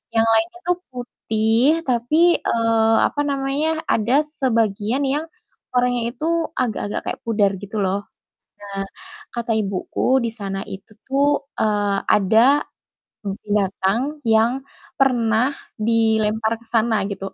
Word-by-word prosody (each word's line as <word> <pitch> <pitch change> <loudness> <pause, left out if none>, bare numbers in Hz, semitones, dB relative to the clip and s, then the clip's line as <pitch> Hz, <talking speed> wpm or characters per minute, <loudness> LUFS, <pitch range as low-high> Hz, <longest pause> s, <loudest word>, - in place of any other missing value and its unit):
yang 225 - +5
lainnya 345 +10 +1
tuh 355 0 +2
putih 245 +4 0
tapi, 245 +4 +1 0.2
eee 225 -1 +2
apa 290 - -3
namanya, 285 +3 -1
ada 240 +7 +3
sebagian 230 -4 0
yang 295 +4 -1 0.5
warnanya 245 -1 +1
itu 310 - -4 0.3
agak-agak 220 -4 -2
kayak - - -4
pudar 210 -3 +2
gitu 205 +2 -6
loh. 195 +1 0 0.6
Nah, 200 -1 -5 0.5
kata 235 -1 -2
ibuku 210 +6 0
di 230 - 0
sana 195 -3 -4
itu 195 +3 -10
tuh, 275 +1 +2 0.3
eee, 205 -2 +1
ada, 225 +8 +4 0.6
mmm, 195 -1 -3
binatang 200 +1 +1 0.2
yang 225 +1 +4 0.5
pernah 245 0 +2 0.2
dilempar 220 0 +1
ke - - -22
sana 225 0 +3
gitu. 195 -1 -5
225 Hz, 120 wpm, -21 LUFS, 210-260 Hz, 0.6 s, yang